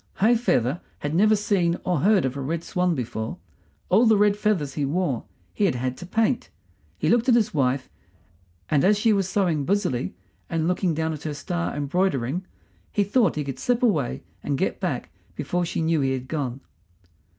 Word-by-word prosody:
High 225 +5 +4
feather 155 - +1 0.2
had 145 +1 -4
never 215 +5 +5
seen 190 -5 +1
or 180 -4 0
heard 195 +1 +4
of 130 0 -2
a 140 - -4
red 160 +5 -2
swan 180 -1 0
before; 110 -3 -4 0.5
all 220 +6 +5
the 220 -1 +5
red 205 0 +4
feathers 200 -10 0
he 145 - -2
wore 145 -3 -1 0.3
he 205 - +1
had 185 - +1
had 130 +1 -2
to 180 - -9
paint. 225 +5 0 0.5
He - - -1
looked 240 +2 +3
at 240 - +6
his 220 -2 +2
wife, 130 -2 +1 0.8
and 145 -3 +2
as 205 +2 +4
she 220 +1 +3
was 195 -2 0
sewing 175 -7 +1
busily 140 - -1 0.3
and 165 -1 0
looking 180 -2 +1
down 160 0 -1
at 150 - -7
her 155 -2 -4
star 175 +3 -3
embroidering 145 +1 -1 0.4
he 205 - +2
thought 205 -2 +2
he 150 - -1
could 135 -2 -6
slip 245 0 0
away 160 - +1 0.2
and 140 -1 -1
get - - -1
back - - -3 0.2
before 175 0 -1
she 165 - -2
knew 160 -2 +2
he 135 -1 +1
had 130 -1 -4
gone. 135 -3 -3
170 Hz, 195 wpm, -24 LUFS, 140-205 Hz, 0.8 s, at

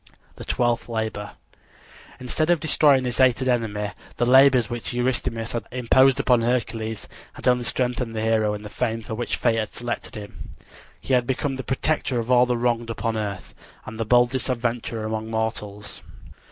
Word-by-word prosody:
THE - - -8
TWELFTH 120 -1 0
LABOR 110 -2 -3 0.9
Instead 155 +6 -1
of 175 -2 +4
destroying 145 -4 +4
his 125 0 -3
hated 130 0 +3
enemy 105 -4 -1 0.2
the 120 - +1
labors 130 -2 +6
which 120 +1 -5
Eurystheus 120 -2 -1
had 115 - -4
imposed 130 +2 +4
upon 125 -2 +3
Hercules 115 -2 -2 0.3
had - - -6
only 125 -1 +3
strengthened 125 -2 -2
the 110 - -2
hero 110 -1 +1
in 105 - -8
the 105 - -8
fame 115 0 -2
for 110 - -6
which 120 +2 -2
fate 115 -2 +1
had 110 - -4
selected 120 0 -5
him. 105 -1 -10 0.4
He 135 - -3
had 125 -1 +3
become 135 +1 -1
the 130 - -5
protector 130 +1 -1
of 115 +1 -2
all 125 0 +5
the 125 -1 0
wronged 120 -1 0
upon 115 0 -2
earth, 100 -3 -5 0.3
and 110 +1 -8
the - - +1
boldest 125 +3 +2
adventurer 115 -2 -2
among 110 0 -3
mortals. 105 -2 -4
120 Hz, 175 wpm, -24 LUFS, 110-125 Hz, 0.9 s, labors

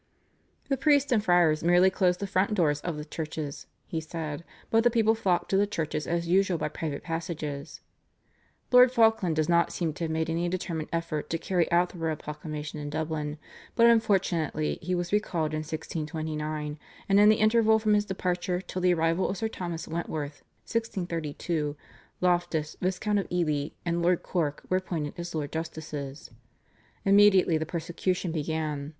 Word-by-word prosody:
The 275 - 0
priests 285 0 +3
and 220 -4 +3
friars 175 -5 +3
merely 175 +2 +5
closed 180 -2 +2
the - - -1
front 200 +2 +1
doors 150 -6 +2
of 170 -3 -3
the 150 - -6
churches, 155 -2 -5 0.2
he 160 - -3
said, 155 -1 -5 0.3
but 225 0 +4
the 240 - +5
people 225 -2 +3
flocked 190 -5 0
to 195 - +4
the 205 +1 +3
churches 155 -5 -3
as 170 0 -1
usual 185 0 +3
by 155 - -2
private 150 -2 -4
passages. 160 -4 -5 0.9
Lord 250 0 +8
Falkland 225 -8 +3
does 155 -1 +1
not 170 0 +3
seem 165 -3 -2
to 170 - -3
have - - -3
made 160 0 -1
any 170 +2 -1
determined 170 -3 -3
effort 165 -3 -2
to 165 - 0
carry 175 0 0
out 175 +1 +3
the 175 - -11
royal 160 -1 -1
proclamation 150 0 -6
in 145 0 -5
Dublin, 155 -1 -3 0.4
but 235 - +5
unfortunately 195 -9 +2
he 180 +2 -1
was 175 +1 -3
recalled 170 -7 0
in 155 - -1
1629, 155 -1 -4 0.3
and 200 0 +4
in 210 +1 +7
the 215 - +6
interval 220 0 +4
from 215 -1 +2
his 205 0 +3
departure 180 -2 -1
till 185 0 -5
the 180 -1 +4
arrival 165 +3 +1
of 190 - -3
Sir 220 +4 -1
Thomas 175 -5 -5
Wentworth 155 -3 -4 0.2
(1632) 165 -7 -2 0.4
Loftus, 175 -4 +1
Viscount 190 +3 0
of 195 - -3
Ely, 155 -5 0 0.2
and 170 0 0
Lord 175 0 +2
Cork 150 -5 -2
were 185 - +2
appointed 165 -6 -3
as 175 -1 -5
Lords 145 -2 -3
Justices. 155 -4 -6 0.7
Immediately 195 -4 +5
the 160 - -3
persecution 175 +2 -2
began. 155 -2 -2
170 Hz, 170 wpm, -28 LUFS, 155-190 Hz, 0.9 s, Lord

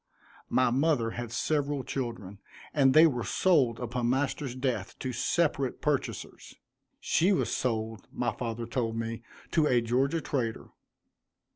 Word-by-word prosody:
My 130 -1 +3
mother 135 -3 +2
had 120 -1 -5
several 145 +2 0
children, 115 -7 -5 0.3
and 135 -3 +4
they 155 +2 +9
were 125 -7 +1
sold 130 - +2
upon 120 0 -1
master's 135 0 -1
death 130 -1 -2
to 130 -2 -4
separate 140 +1 0
purchasers. 150 -3 -3 0.4
She 180 +5 +2
was 190 - +1
sold, 110 -4 -2
my 120 -1 -1
father 115 +1 -4
told 115 -1 -2
me, 115 0 -3 0.3
to 155 -2 +3
a 125 -3 +4
Georgia 130 +7 +1
trader. 120 -7 -3
125 Hz, 135 wpm, -29 LUFS, 115-145 Hz, 0.4 s, they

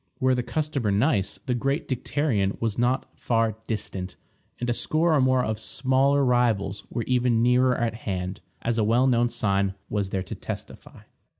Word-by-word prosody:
Were 130 0 +3
the 125 - +1
customer 140 -1 -2
nice, 100 -2 +1
the 130 - 0
great 135 +5 -1
dicterion 120 -6 0
was 115 -1 -1
not 125 +2 +1
far 115 -2 0
distant, 95 -4 -3 0.4
and 120 - -2
a 120 - +2
score 160 +6 +1
or 145 - +4
more 130 -1 +3
of 110 -1 -2
smaller 135 +4 +2
rivals 115 -5 +1
were 120 - -2
even 125 -2 +2
nearer 125 +1 +3
at 115 -2 0
hand, 95 -4 -4 0.2
as 115 0 0
a - - +3
well 115 +4 +3
known 120 -2 +3
sign 100 -3 0 0.2
was 100 -2 -1
there 95 -1 -2
to 90 - -7
testify. - - -8
120 Hz, 175 wpm, -25 LUFS, 105-130 Hz, 0.4 s, or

